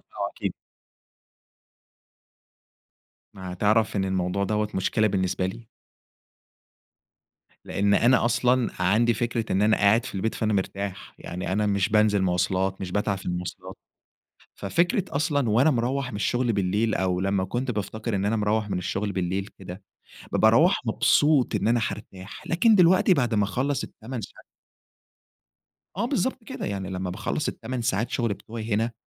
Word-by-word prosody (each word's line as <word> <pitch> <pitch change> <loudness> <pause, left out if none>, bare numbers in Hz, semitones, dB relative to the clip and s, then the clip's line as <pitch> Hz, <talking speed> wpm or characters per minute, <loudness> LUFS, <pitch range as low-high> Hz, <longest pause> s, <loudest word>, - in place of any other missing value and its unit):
آه، - - -5
أكيد. - - -4 2.8
ما 95 -1 -7
تعرف 105 +2 +2
إن 95 - +1
الموضوع 95 +1 -1
دوَّة 105 +1 0
مشكلة 110 +3 +1
بالنسبة 95 -2 0
لي؟ 115 +4 -8 2.0
لأن 100 0 +1
أنا 120 0 +4
أصلًا 120 +1 +2
عندي 115 +6 +3
فكرة 115 0 -2
إن 95 +2 +2
أنا 110 +1 +4
قاعد 110 +3 +3
في - - -8
البيت 105 +4 -1
فأنا 110 -1 -1
مرتاح، 100 -1 -3
يعني 90 +2 -5
أنا 105 +2 +1
مش 100 -2 +1
بانزل 105 -2 +3
مواصلات، 95 +1 0
مش 95 - -5
باتعب 100 -1 0
في - - -12
المواصلات، 90 0 -5 0.8
ففكرة 180 +4 0
أصلًا 145 -5 +1
وأنا 130 +9 +4
مروّح 125 +2 -1
من - - -6
الشغل 120 +3 0
بالليل، 100 +3 0
أو 90 -1 0
لمّا 95 0 0
كنت 125 +3 -2
بافتكر 110 +1 -3
إن 100 0 -1
أنا 110 +2 +1
مروّح 105 0 0
من 95 - -1
الشغل 95 +3 -2
بالليل 95 +1 -2
كده، 95 +1 -9 0.5
ب - - -2
باروّح - - +5
مبسوط 145 -6 +3
إن 105 +1 0
أنا 120 +1 +3
حارتاح، 100 -3 -6
لكن 215 +6 +4
دلوقتي 185 0 +5
بعد 125 -8 0
ما 105 -1 +3
أخلّص 130 +8 -1
ال8 120 +1 -7
ساعات - - -11 1.5
آه - - 0
بالضبط - - -1
كده، - - -6
يعني 95 -2 -4
لما 90 -1 -3
باخلّص 115 +9 -2
8 130 -2 -4
ساعات 115 0 0
شغل 115 -4 0
بتوَعي 110 0 -5
هنا، 115 +2 0
105 Hz, 150 wpm, -25 LUFS, 95-120 Hz, 2.8 s, باروّح